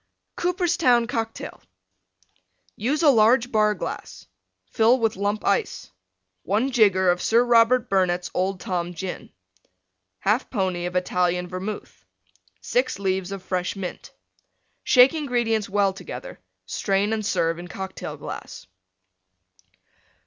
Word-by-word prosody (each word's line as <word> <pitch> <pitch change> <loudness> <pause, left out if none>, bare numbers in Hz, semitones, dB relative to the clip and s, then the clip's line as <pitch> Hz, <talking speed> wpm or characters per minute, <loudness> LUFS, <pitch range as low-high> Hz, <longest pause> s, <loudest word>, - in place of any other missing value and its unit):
COOPERSTOWN 345 -9 +2
COCKTAIL 225 -1 -5 1.1
Use 285 +9 -1
a 295 - +7
large 235 +1 +4
Bar 215 -1 +3
glass. - - -7 0.5
Fill 230 +2 +4
with 225 -2 +1
Lump 205 +2 -2
Ice. 200 - -1 0.5
One 220 - 0
jigger 195 -6 +4
of 175 - -2
Sir 230 +2 +3
Robert 240 0 +4
Burnette's 180 -2 0
Old 190 +1 -1
Tom 175 -1 -3
Gin. 185 +3 -6 1.0
1/2 215 +6 +1
pony 185 -5 -1
of 180 - -7
Italian 180 -1 0
Vermouth. 190 +4 -7 0.6
Six - - 0
leaves 190 -1 -2
of 195 -2 -6
fresh 185 0 -2
Mint. 190 -2 -7 0.7
Shake 255 +2 +6
ingredients 240 -8 -1
well 200 -1 +2
together. 195 - -9 0.3
Strain 200 +2 0
and 220 -1 -2
serve 165 -4 0
in 175 - -8
Cocktail 190 +1 -7
glass. - - -8
205 Hz, 120 wpm, -24 LUFS, 185-235 Hz, 1.1 s, a